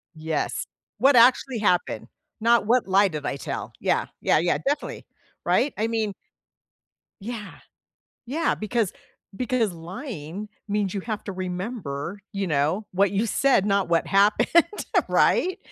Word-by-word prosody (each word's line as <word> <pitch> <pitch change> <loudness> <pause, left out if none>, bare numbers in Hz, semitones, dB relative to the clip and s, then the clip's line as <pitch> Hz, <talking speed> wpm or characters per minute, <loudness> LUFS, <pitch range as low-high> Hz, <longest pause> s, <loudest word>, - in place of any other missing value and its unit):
Yes. 160 -1 -2 0.3
"What 275 0 +5
actually 245 0 +5
happened?" 180 -4 0 0.3
Not, 235 -2 +4
"What 240 -1 +2
lie 195 +1 +5
did 150 -4 -5
I - - -1
tell?" - - -5
Yeah. - - +1 0.2
Yeah, - - +3
yeah. 175 +1 +1
Definitely. 290 +2 -3 0.4
Right? 280 - +2
I 220 +2 0
mean 220 -3 -1 1.1
Yeah, 215 -1 -6 0.7
yeah, 315 +6 0
because 215 -2 -1 0.4
because 245 -5 0
lying 180 - -7 0.2
means 205 -1 -1
you 195 - -1
have 215 0 -5
to 200 - -5
remember, 185 - -4
you 200 -1 -2
know, 155 +7 0
what 195 +1 +3
you 205 +3 0
said, 240 -3 +3
not 200 -3 +1
what 170 -1 +2
happened, 200 +1 +3 0.6
right, 370 +2 +3
205 Hz, 135 wpm, -25 LUFS, 180-235 Hz, 1.1 s, What